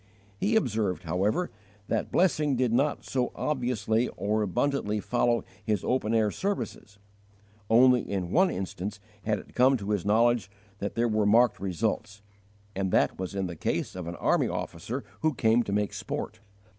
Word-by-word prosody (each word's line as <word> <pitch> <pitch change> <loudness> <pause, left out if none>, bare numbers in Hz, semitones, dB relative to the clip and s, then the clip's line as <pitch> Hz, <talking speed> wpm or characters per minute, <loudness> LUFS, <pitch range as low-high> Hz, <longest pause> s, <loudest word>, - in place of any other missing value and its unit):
He 225 +2 +1
observed, 110 - 0
however, 100 - 0 0.4
that - - -1
blessing 155 -6 +2
did 125 -2 +1
not 140 +4 +1
so 125 -2 -1
obviously 120 -5 0
or 105 +2 0
abundantly 105 +1 0
follow 120 +2 +1 0.2
his 105 -4 0
open 115 -3 0
air 110 -2 +3
services: 190 - -4 0.7
only 125 +1 +6
in 95 -4 -3
one 185 +2 +4
instance 95 +2 -4 0.3
had 105 -1 +1
it - - -12
come 130 +2 +4
to 105 -1 -4
his 100 -4 0
knowledge 115 0 +3 0.3
that 100 - -4
there 120 +1 +2
were 110 -2 +1
marked 115 +2 +4
results, 105 +2 -2 0.5
and 95 0 -1
that - - +2
was 95 +1 -4
in 95 -1 -1
the 85 -1 -5
case 80 - -2
of 90 -2 -5
an 85 - -5
army - - +2
officer - - -4 0.2
who 155 -3 +1
came 115 +1 +3
to 105 - -4
make 105 0 0
sport. 110 - -5
110 Hz, 165 wpm, -28 LUFS, 100-125 Hz, 0.7 s, only